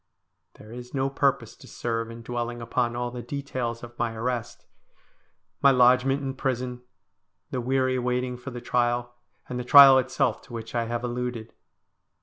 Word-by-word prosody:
There 110 - -14
is 125 +2 -9
no 135 0 0
purpose 135 -5 0
to - - -15
serve 115 -1 -3
in 115 0 -10
dwelling 120 0 -4
upon 120 0 -1
all 120 0 -3
the 125 0 -6
details 125 -4 -4
of 120 0 -11
my 115 -1 -1
arrest; 120 0 -4 1.0
my 140 - +7
lodgment 130 +2 +4
in 135 -1 -3
prison; 125 -2 -3 0.7
the 125 - -2
weary 130 +1 +1
waiting 125 0 -1
for 125 +3 -8
the 120 -1 -7
trial; 120 0 0 0.3
and 125 - -4
the - - -3
trial 135 0 +9
itself 130 -2 0
to 130 - -14
which 115 -1 -7
I 120 -1 0
have 120 +1 -3
alluded. 120 -2 -4
125 Hz, 165 wpm, -26 LUFS, 120-130 Hz, 1.0 s, trial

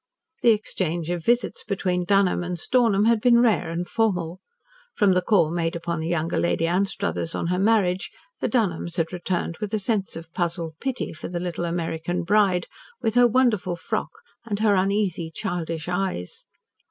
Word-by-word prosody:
The 235 - +5
exchange 175 -6 0
of 175 -2 -3
visits 240 +3 +1
between 180 -3 -1
Dunholm 195 -2 +3
and 175 0 -3
Stornham 220 0 +2
had 230 -1 +3
been 240 0 +5
rare 230 -8 +2
and 170 +1 -3
formal. 180 -6 0 0.6
From 205 -4 +4
the 180 - +2
call 180 -5 +3
made 165 -1 -1
upon 170 0 -3
the 160 - -3
younger 170 0 0
Lady 170 -1 +1
Anstruthers 165 - -1
on - - -2
her 180 - 0
marriage, 195 -3 +2 0.3
the - - 0
Dunholms 175 -8 0
had 165 +1 -1
returned 175 -2 -2
with 210 0 -2
a - - 0
sense 205 -2 -1
of 165 0 -9
puzzled 170 -2 -2
pity 265 -2 -3
for 155 - -7
the 175 0 -4
little 175 -1 -3
American 170 +1 -2
bride, 190 -1 +3 0.4
with 220 - +1
her 245 0 +6
wonderful 225 -7 +2
frock 215 +6 -3 0.3
and 210 -3 -3
her 215 -2 +4
uneasy, 190 -3 0
childish 165 -1 -4
eyes. 180 - -3
180 Hz, 175 wpm, -24 LUFS, 170-210 Hz, 0.6 s, her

